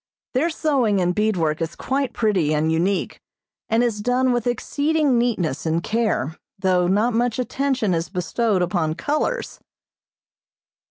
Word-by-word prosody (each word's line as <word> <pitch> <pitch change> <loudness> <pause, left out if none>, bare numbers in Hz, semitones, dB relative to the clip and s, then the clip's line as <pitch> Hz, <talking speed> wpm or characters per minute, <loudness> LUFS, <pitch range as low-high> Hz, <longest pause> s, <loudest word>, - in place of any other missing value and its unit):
Their 280 +7 +2
sewing 270 - +1
and 180 -1 +1
bead 210 0 +1
work 160 -1 0
is 165 0 -3
quite 270 -1 -1
pretty 190 -11 +1
and 155 +1 +1
unique, 180 +5 -1 0.5
and 225 +2 +3
is 225 -4 -1
done 250 +3 +2
with 240 -1 0
exceeding 285 +2 +1
neatness 205 - -1
and 165 +1 0
care, 215 - -1 0.2
though 185 -2 +2
not 210 +6 +2
much 235 0 +1
attention 255 -5 0
is 165 0 -1
bestowed 190 +2 0
upon 170 -3 -1
colors. 305 - -2
215 Hz, 145 wpm, -22 LUFS, 175-245 Hz, 0.5 s, and